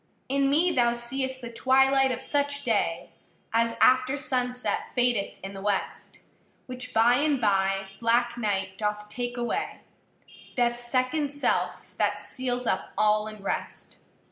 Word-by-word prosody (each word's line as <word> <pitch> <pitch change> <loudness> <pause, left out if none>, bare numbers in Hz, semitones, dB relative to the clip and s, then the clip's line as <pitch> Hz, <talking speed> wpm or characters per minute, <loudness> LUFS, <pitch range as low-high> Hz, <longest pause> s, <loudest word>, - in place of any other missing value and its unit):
In 275 0 +1
me 325 +6 +4
thou 240 -6 +3
seeâst 260 +2 -3
the 235 -1 -8
twilight 265 +2 +3
of 250 +1 -4
such 285 0 -1
day 235 -4 0 0.4
As 230 0 +2
after 260 +2 +4
sunset 250 -2 -1
fadeth 245 -5 +1
in 195 +1 -6
the 195 - -8
west; 200 -1 -3 0.4
Which 250 0 -5
by 235 +2 +4
and 290 -1 +1
by 195 -2 +1
black 235 +1 +2
night 195 -4 -2
doth 210 0 -2
take 245 +1 -4
away, 240 +13 -3 0.8
Deathâs 240 -1 +1
second 255 +4 0
self, 285 0 -2
that - - +1
seals 250 -1 -3
up - - -2
all 215 0 +3
in 215 -2 -10
rest. - - -4
245 Hz, 140 wpm, -27 LUFS, 220-265 Hz, 0.8 s, me